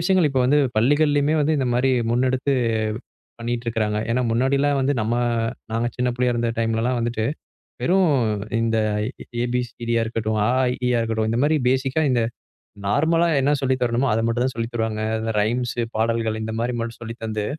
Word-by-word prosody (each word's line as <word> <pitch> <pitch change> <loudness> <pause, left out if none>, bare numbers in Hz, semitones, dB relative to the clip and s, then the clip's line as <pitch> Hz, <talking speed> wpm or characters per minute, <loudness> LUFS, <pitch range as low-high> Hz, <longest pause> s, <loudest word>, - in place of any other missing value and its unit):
விஷயங்கள் 180 -2 +3
இப்ப 135 -1 +1
வந்து 140 +4 +4 0.2
பள்ளிகள்லயுமே 145 +5 +3
வந்து 150 +2 +2
இந்த 130 - 0
மாதிரி 130 +2 +2 0.2
முன்னெடுத்து 130 +3 +1 0.9
பண்ணிட்டு 120 0 -3
இருக்காங்க. 110 -2 0
ஏன்னா 125 +2 +1
முன்னாடிலாம் 140 +4 +2
வந்து 135 +2 +2
நம்ம 110 +2 0 0.6
நாங்க 115 +1 0
சின்னப் 125 -1 -1
பிள்ளையா 125 -1 +1
இருந்த 120 0 0
time-ல 115 0 0
எல்லாம் 125 0 0
வந்துட்டு 115 -2 -1 0.6
வெறும் 185 -1 +3 0.5
இந்த 115 0 +1 0.7
எ - - +1
பி 125 - +2
சி 120 - -19 0.2
டி 120 - +2
ஆ - - +2
இருக்கட்டும், 110 -1 -2
அ - - +2
ஆ - - +3
இ - - -3
ஈ - - +2
ஆ - - +2
இருக்கட்டும் 110 -1 -1
இந்த 115 - 0
மாதிரி 155 +2 +3
பேசிக்கா 130 +3 +1
இந்த 120 -2 +2 0.6
நார்மலா 160 +10 +2 0.2
என்ன 140 +2 +2
சொல்லித் 130 -1 0
தரணுமோ 120 +2 +1
அதை 110 - +1
மட்டும்தான் 120 +3 0
சொல்லித் 115 +1 -4
தருவாங்க. 110 -2 -2 0.2
அந்த 110 0 -2
ரைம்ஸ், 120 +3 -1 0.2
பாடல்கள் 110 0 0
இந்த 110 0 -4
மாதிரி 120 +2 -1
மட்டும் 115 +1 -5
சொல்லித் 115 0 -8
தந்து, 110 -1 -2
120 Hz, 190 wpm, -22 LUFS, 115-135 Hz, 0.9 s, வந்து